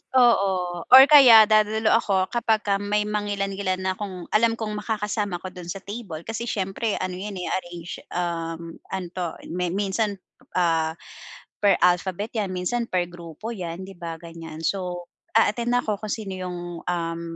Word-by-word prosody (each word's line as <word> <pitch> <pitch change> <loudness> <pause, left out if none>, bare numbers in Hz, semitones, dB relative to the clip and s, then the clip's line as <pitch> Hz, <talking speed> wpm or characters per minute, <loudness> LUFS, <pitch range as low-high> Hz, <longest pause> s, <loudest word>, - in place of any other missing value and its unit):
Oo, 190 -8 +3
or 265 +1 +11
kaya 265 -7 +9
dadalo 215 +1 +3
ako 195 -5 +2
kapagka 215 -4 +1
may 210 +1 0
mangilan-ngilan 200 -2 -2
akong 185 -2 -6
alam 225 +1 +3
kong 210 -2 -4
makakasama 210 -3 -2
ko 185 - -6
do'n 180 -2 -10
sa 190 +2 -6
table. 195 -6 -7
Kasi 225 +1 -4
siyempre, 200 +2 -1
ano 185 - -3
'yan, 205 0 -5
eh, 180 - -4
arrange 175 -2 -5 0.2
um, 165 -1 -3 0.2
ano 190 -2 -4
'to, 175 -3 -4 0.2
mi 180 +1 -1
minsan, 200 +3 -1 0.4
ah, 165 -2 +1 0.6
per 205 -1 +4
alphabet 180 +4 +1
'yan, 195 -3 -2
minsan 230 +6 -1
per 180 -1 +1
grupo 175 +6 -8
'yan, 180 -3 -5
'di 195 0 -10
ba, 165 -1 -5
ganiyan. 165 -1 -9
So, 180 -1 -2 0.3
a-attend 235 +2 +3
ako 215 -4 0
kung 215 -2 -3
sino 205 -4 -5
'yong, 180 -1 -5 0.3
um, 170 -1 -2
195 Hz, 155 wpm, -24 LUFS, 175-215 Hz, 0.6 s, or